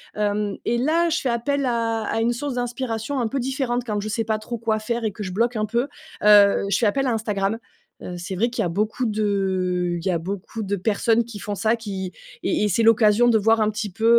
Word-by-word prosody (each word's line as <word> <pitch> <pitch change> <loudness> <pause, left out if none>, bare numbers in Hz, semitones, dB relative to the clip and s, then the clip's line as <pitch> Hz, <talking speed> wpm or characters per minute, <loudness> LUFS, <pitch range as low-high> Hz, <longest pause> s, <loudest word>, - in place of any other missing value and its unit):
hem, 205 -1 -1
et 235 - +1
là, 320 +7 +2
je 335 - 0
fais 260 - -1
appel 275 +4 0
à 230 -2 0
à 225 - -1
une 235 +2 +2
source 270 +2 -4
d'inspiration 245 +1 -2
un 230 - -1
peu 270 - -2
différente 250 -1 -1
quand 210 -3 -2
je 215 - -4
sais 225 +1 -1
pas 220 -1 0
trop 235 +2 -5
quoi 220 -1 0
faire 230 +2 -2
et 215 - -1
que 210 - -6
je 185 - -4
bloque 235 +6 0
un 215 -1 0
peu, 235 +3 0 0.4
heu, 205 -1 +6
je 200 - +2
fais 235 - +1
appel 270 +6 +1
à 245 - +1
Instagram, 210 -1 -1 0.5
heu, 180 - -6
c'est 185 +2 -5
vrai 230 +6 +1
qu'il 235 -1 -2
y - - 0
a - - -1
beaucoup 215 +7 -1
de 190 -5 0
il - - -11
y - - +2
a 175 - +2
beaucoup 195 +5 -5
de 200 0 -1
personnes 220 +4 +1
qui 230 -2 -9
font 205 - -4
ça 220 +3 +2
qui 195 -5 -5 0.3
et - - +1
et - - +3
c'est 205 +3 +1
l'occasion 225 +1 +5
de 235 -2 +5
voir 225 +1 +3
un 215 - +3
petit 215 -1 -4
peu, 225 +5 -3
220 Hz, 255 wpm, -23 LUFS, 205-235 Hz, 0.5 s, heu